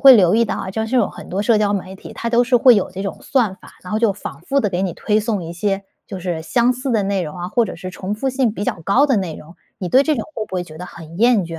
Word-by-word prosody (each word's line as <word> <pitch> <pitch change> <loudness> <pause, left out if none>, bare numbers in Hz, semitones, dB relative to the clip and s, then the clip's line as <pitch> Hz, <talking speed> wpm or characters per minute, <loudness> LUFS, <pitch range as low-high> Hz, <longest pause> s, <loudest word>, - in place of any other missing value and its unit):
会 270 -1 +10
留 185 -4 +5
意 230 +1 +4
到 - - -2
啊， 190 - -4
就 220 +3 -2
是 255 +3 0
有 - - +3
很 - - -11
多 190 +2 -2
社 220 +1 +4
交 205 -1 +2
媒 190 -1 -3
体， - - -11
它 235 - -4
都 240 0 +4
是 245 0 +3
会 245 0 +7
有 200 - 0
这 185 +1 -7
种 195 - -4
算 240 -9 +1
法， - - -16
然 180 - -8
后 215 - +1
就 225 -3 +3
反 200 - -8
复 275 +11 0
地 210 - +2
给 180 +1 -1
你 185 - -1
推 215 +5 0
送 210 -5 -2
一 165 - -6
些 195 +2 -1 0.2
就 190 - -6
是 175 -3 -3
相 240 +9 +2
似 255 +2 -4
的 220 -4 +2
内 195 -2 0
容 150 +1 -6
啊， 175 +1 -4
或 240 +3 +2
者 - - -6
是 185 +2 -6
重 190 +2 -5
复 245 +6 -2
性 255 -3 +1
比 205 - -4
较 170 - -2
高 245 - +4
的 265 - +2
内 185 -6 -2
容。 160 +3 -13 0.2
你 180 - -3
对 260 +8 +5
这 305 +1 +1
种 225 - -3
会 220 - -3
不 - - -8
会 180 - -2
觉 155 -2 -12
得 180 - -6
很 165 -1 -11
厌 235 -3 +4
倦 165 -1 -7
205 Hz, 345 characters per minute, -20 LUFS, 180-235 Hz, 0.2 s, 会